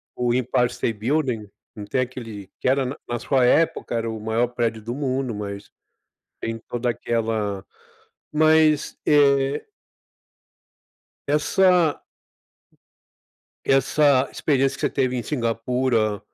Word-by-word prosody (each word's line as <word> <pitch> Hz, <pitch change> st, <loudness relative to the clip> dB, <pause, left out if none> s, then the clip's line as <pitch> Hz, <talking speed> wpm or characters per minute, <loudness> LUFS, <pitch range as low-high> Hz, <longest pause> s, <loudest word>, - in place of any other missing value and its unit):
o 120 Hz, -1 st, 0 dB
Empire 125 Hz, -1 st, +1 dB
State 115 Hz, -2 st, -3 dB
Building. 125 Hz, -3 st, -1 dB, 0.3 s
Não 105 Hz, -, -7 dB
tem 130 Hz, +5 st, 0 dB
aquele 115 Hz, -6 st, -7 dB
que -, -, 0 dB
era 135 Hz, +1 st, +2 dB
na 130 Hz, +2 st, -4 dB
na 120 Hz, 0 st, -2 dB
sua 130 Hz, +2 st, +1 dB
época, 160 Hz, -2 st, +2 dB
era 115 Hz, 0 st, -1 dB
o 110 Hz, -1 st, -6 dB
maior 110 Hz, +3 st, 0 dB
prédio 115 Hz, -2 st, -2 dB
do 115 Hz, +3 st, -4 dB
mundo, 130 Hz, -3 st, -2 dB
mas 100 Hz, -1 st, -6 dB, 0.7 s
tem 115 Hz, 0 st, -3 dB
toda 120 Hz, 0 st, -1 dB
aquela 110 Hz, -4 st, -2 dB, 0.7 s
mas 155 Hz, -1 st, +3 dB
é 140 Hz, -2 st, +3 dB, 1.6 s
Essa 165 Hz, +2 st, +3 dB, 1.6 s
essa 135 Hz, 0 st, +3 dB
experiência 135 Hz, -2 st, +1 dB
que -, -, -10 dB
você -, -, +1 dB
teve 130 Hz, -2 st, 0 dB
em 120 Hz, -, -2 dB
Singapura 115 Hz, -3 st, 0 dB
125 Hz, 120 wpm, -23 LUFS, 115-140 Hz, 1.6 s, mas